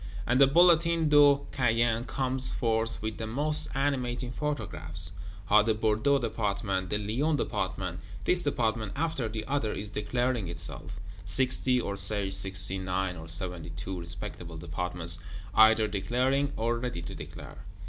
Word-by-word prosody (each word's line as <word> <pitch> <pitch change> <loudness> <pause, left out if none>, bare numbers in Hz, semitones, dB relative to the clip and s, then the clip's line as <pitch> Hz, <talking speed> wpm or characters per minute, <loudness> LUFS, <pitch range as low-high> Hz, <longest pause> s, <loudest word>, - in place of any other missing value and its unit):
And 125 +3 +2
the 135 - +8
Bulletin 170 +1 +4
de 145 -1 +6
Caen 115 -2 +1
comes 130 -1 +2
forth, 115 -2 -1
with 110 0 -4
the 110 - -3
most 150 +6 +3
animating 125 -3 -1
paragraphs: 90 - -3 0.3
How 105 +2 +5
the 110 0 +1
Bordeaux 110 +6 +2
Department, 100 -5 -2
the 105 - 0
Lyons 125 +10 0
Department, 95 -6 -3 0.3
this 180 -1 +2
Department 110 - -1
after 145 -7 -2
the 110 0 -5
other 135 -6 -1
is 105 0 -6
declaring 120 0 -1
itself; 85 +4 -7 0.2
sixty, 125 +5 +1
or 100 -4 -3
say 100 -1 -1
sixty 95 0 +1
nine, 95 0 -2
or 80 -1 -9
seventy 85 0 -2
two 90 +3 -6
respectable 85 0 -5
Departments 85 +1 +2 0.3
either 110 +1 +6
declaring, 130 +7 0
or 115 +1 0
ready 120 -8 -4
to 90 +4 -7
declare. - - -10
110 Hz, 145 wpm, -28 LUFS, 95-130 Hz, 0.3 s, the